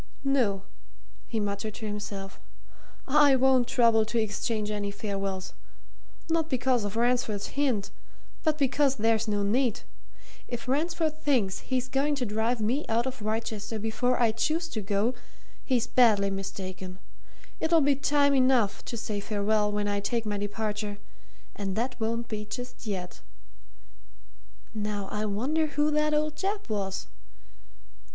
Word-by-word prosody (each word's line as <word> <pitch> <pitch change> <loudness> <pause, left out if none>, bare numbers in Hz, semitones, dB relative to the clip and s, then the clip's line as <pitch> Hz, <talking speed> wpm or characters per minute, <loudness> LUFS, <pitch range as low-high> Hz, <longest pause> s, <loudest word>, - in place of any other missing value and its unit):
"No," 240 -9 +2 0.6
he 225 - -2
muttered 205 +1 -2
to 220 - -6
himself. 205 -2 -5 0.7
"I 285 0 +6
won't 260 -2 +4
trouble 230 -3 +4
to 230 +2 -2
exchange 215 0 -1
any 205 -1 -2
farewells 195 -2 -4 0.7
not 325 -1 +1
because 255 -2 +2
of 205 +1 -3
Ransford's 235 -3 +1
hint, 255 -8 0 0.5
but 310 -2 +2
because 280 -1 +2
there's 225 0 +2
no 205 -1 +1
need. 235 +3 +1 0.7
If 240 0 -5
Ransford 315 +2 0
thinks 230 -11 +1
he's 255 -1 -1
going 275 +3 +1
to 260 -3 -1
drive 225 +3 0
me 250 +8 +1
out 230 +2 +2
of 260 -3 -4
Wrychester 220 0 -2
before 225 +4 0
I 235 -2 +4
choose 315 +9 0
to 220 - -3
go 205 +4 +1 0.5
he's 245 -3 +1
badly 215 -6 +4
mistaken 185 -1 -5 0.6
it'll 325 +1 +4
be 285 -1 +4
time 285 +1 +3
enough 255 -6 +3
to 235 - -4
say 215 -2 -3
farewell 210 0 +1
when 205 0 -1
I 205 0 0
take 230 +3 -1
my 205 -1 -1
departure 210 0 -3 0.6
and 195 -2 -3
that 245 +3 -1
won't 230 +1 -1
be 210 -1 -4
just 245 +1 -7
yet. 185 -3 -4 1.5
Now 210 -2 -3
I 210 +1 -1
wonder 265 +10 0
who 295 +1 +1
that 300 0 +2
old 305 0 0
chap 400 - -2
was? 195 -2 -2
225 Hz, 145 wpm, -28 LUFS, 205-265 Hz, 1.5 s, I